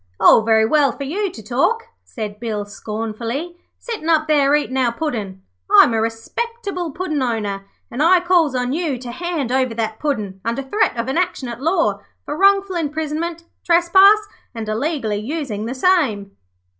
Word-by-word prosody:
'All - - +7
very 220 0 +3
well 280 +2 +3
for 280 - -7
you 385 +9 -2
to 225 -10 -11
talk,' 275 - +1 0.2
said 210 -3 -7
Bill, 215 -3 -3
scornfully, 225 - -5 0.2
'sittin' 440 -9 -5
up 315 -1 +3
there 290 -2 +4
eatin' 290 -3 -1
our 255 -3 +2
Puddin'. 215 -9 -4 0.3
I'm 235 - +7
a 220 - +1
respectable 365 - -4
Puddin' 310 -2 -3
owner, 210 -5 -2 0.3
an' 245 - -3
I 355 +3 +6
calls 345 -6 +2
on 250 +1 -1
you 310 -5 -1
to 245 0 -8
hand 320 -3 -3
over 255 -3 +1
that 220 -1 -3
Puddin' 210 -10 -3
under 235 +4 -2
threat 265 - 0
of 230 +1 -2
an 270 +6 0
action 355 -8 -2
at 235 +1 -7
law 290 - +1 0.3
for 295 - -4
wrongful 395 +1 +3
imprisonment, 320 +2 -3 0.2
trespass, 380 +5 +5 0.3
and 225 -1 -5
illegally 225 -1 -1
using 225 -2 -4
the 255 - -4
same.' 255 - +1
275 Hz, 170 wpm, -20 LUFS, 225-340 Hz, 0.3 s, All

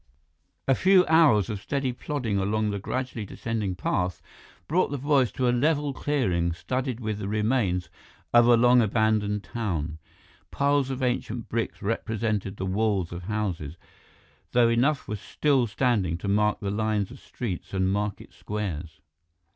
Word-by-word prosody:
A 135 - +5
few 185 +5 +5
hours 155 - +5
of 105 -4 -4
steady 135 -1 -1
plodding 120 -6 -2
along 105 +2 0
the 100 - -3
gradually 125 +2 -3
descending 105 -2 -3
path 90 -1 -1 0.5
brought 180 +3 +2
the 145 - -3
boys 135 -4 +2
to 125 - 0
a - - +4
level 145 +2 +1
clearing 95 - 0
studded 125 +6 -3
with 110 -3 -3
the 100 - -4
remains 105 -4 0 0.5
of 120 0 +7
a 120 -1 +6
long 120 +1 +6
abandoned 110 -1 +1
town. 80 -9 -3 0.5
Piles 140 -1 +1
of 130 0 -3
ancient 120 -2 -2
bricks 115 -2 -3
represented 110 -2 -2
the 95 - -3
walls 100 -2 0
of 85 0 -7
houses, 90 -7 -3 0.8
though 120 -1 +5
enough 130 +5 +1
were 105 - -3
still 135 +4 +1
standing 105 -6 +1
to 95 - -6
mark 105 +1 +2
the 100 -1 -2
lines 105 -1 0
of - - -11
streets 95 -6 -6
and 95 0 +1
market 105 0 -3
squares. 85 -7 -5
110 Hz, 155 wpm, -26 LUFS, 100-125 Hz, 0.8 s, of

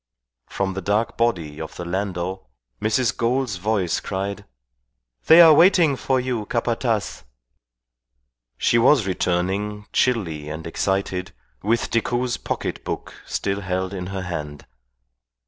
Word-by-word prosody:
From 95 -1 -2
the 95 - -4
dark 105 +4 0
body 85 -11 -1
of 80 - -7
the 90 - -6
landau 95 -2 -3 0.3
Mrs. 110 0 +1
Gould's 120 -3 0
voice 95 -3 0
cried, 100 +1 -4 0.8
"They 165 +2 +9
are 165 -2 +9
waiting 170 -3 +5
for 130 0 0
you, 125 -4 -2
Capataz!" 115 -2 -1 1.3
She 115 - +3
was 125 -1 +5
returning, 95 +3 -1
chilly 85 -12 0
and 80 +1 -6
excited, 95 +1 -2 0.3
with 115 +3 0
Decoud's 120 +2 0
pocket - - -4
book - - -5
still 100 0 -2
held 95 0 -2
in 90 -2 -5
her 95 0 -4
hand. 75 -5 -6
100 Hz, 125 wpm, -22 LUFS, 90-115 Hz, 1.3 s, They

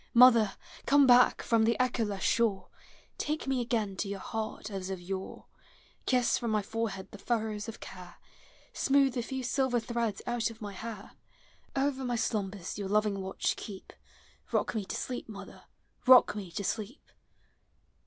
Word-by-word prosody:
Mother, 235 -4 +7 0.3
come 285 0 +6
back 250 -1 +6
from 230 -1 +3
the 230 +2 +2
echoless 225 -6 0
shore, 225 -5 +1 0.5
Take 305 +1 -2
me 265 -2 0
again 225 -5 -1
to 200 - -2
your 200 0 -3
heart 215 +1 -5
as 190 -1 -4
of 190 -1 -4
yore; 190 +2 -6 0.6
Kiss 250 -2 +3
from 235 - -2
my 215 -1 +1
forehead 210 -3 -3
the 205 - -10
furrows 220 -2 -2
of 225 - -9
care. 180 -2 -10 0.6
Smooth 275 -1 +3
the 240 - -1
few 265 +2 -4
silver 255 -1 +1
threads 230 -2 -2
out 240 -2 0
of 225 -1 -12
my 205 -2 -6
hair; 220 +3 -7 0.6
Over 270 -1 0
my 245 -1 -1
slumbers 205 -5 -2
your 195 -2 -3
loving 210 -1 +1
watch 190 0 -1
keep; 195 -3 -9 0.3
— - - -29
Rock - - +1
me 215 -4 -2
to - - -4
sleep, 250 -2 -4
mother, 200 -2 -10 0.4
rock 255 -4 +8
me 200 -4 -5
to 200 - -3
sleep! 220 +6 -4
225 Hz, 165 wpm, -30 LUFS, 200-245 Hz, 0.6 s, rock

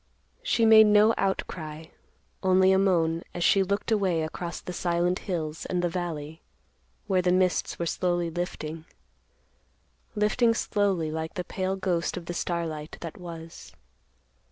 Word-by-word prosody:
She 365 - +2
made 220 -1 +8
no 210 +2 +5
outcry, 160 -5 -3 0.6
only 190 0 +4
a 190 - +4
moan, 165 -4 +2
as 175 - -1
she 195 - +5
looked 200 +3 -1
away 190 -7 +1
across 170 +2 -5
the 180 - -7
silent 175 +1 0
hills 155 -3 -3
and 180 -1 -1
the 175 - +1
valley, 160 -3 -5 0.6
where 190 -3 +2
the 180 0 +2
mists 185 0 +1
were 170 - -2
slowly 175 0 -1
lifting; 160 -2 -5 1.3
lifting 225 +3 +2
slowly 195 -8 0
like 160 0 -4
the 180 - -2
pale 190 +1 -2
ghost 180 -3 -1
of 175 - -7
the 175 - -4
starlight 165 -3 -3
that 165 -2 -7
was. 165 -2 -10
175 Hz, 145 wpm, -27 LUFS, 165-190 Hz, 1.3 s, made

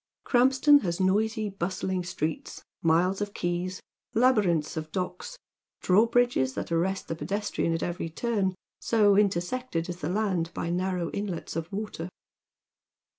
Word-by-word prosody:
Krampston 265 +3 +5
has 170 -2 -2
noisy, 215 +3 +1
bustling 185 0 -2
streets, 160 -2 -4 0.2
miles 175 +4 +2
of 205 0 -3
quays, 175 +1 -2 0.3
labyrinths 205 -11 +3
of 155 -1 -5
docks, 335 - -4 0.4
drawbridges 225 - +3
that - - -4
aiTest 175 +3 0
the - - -3
pedestrian 200 -1 -2
at 165 - -1
every 175 -1 -3
turn, 195 0 -1 0.2
so 210 -3 +4
intersected 195 -1 0
is 175 - -4
the 155 - -3
land 185 -4 0
by 170 - -2
narrow 180 -1 -1
inlets 200 -4 -4
of 165 +2 -4
water. 195 -4 -4
185 Hz, 130 wpm, -27 LUFS, 170-215 Hz, 0.4 s, Krampston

